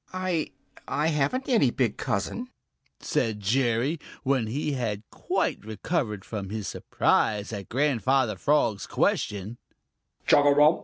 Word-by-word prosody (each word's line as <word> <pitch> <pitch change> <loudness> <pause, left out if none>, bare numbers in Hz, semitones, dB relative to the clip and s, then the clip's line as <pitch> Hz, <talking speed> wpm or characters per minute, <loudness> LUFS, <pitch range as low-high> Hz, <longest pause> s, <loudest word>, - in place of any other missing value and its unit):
"I 185 -4 -1 0.4
I 150 +3 +1
haven't 165 - 0
any 225 - +4
big 120 -4 0
cousin," 235 - -2 0.5
said 110 -3 -1
Jerry, 120 - +1 0.2
when 130 -5 +1
he 145 +6 -2
had 115 -6 -2
quite - - -1
recovered 110 - -2
from 100 -4 -5
his 105 -1 -4
surprise 105 +1 +1
at 100 -2 -6
Grandfather 130 -3 +2
Frog's 110 -3 +1
question. 105 +3 -1
120 Hz, 110 wpm, -27 LUFS, 105-150 Hz, 0.5 s, any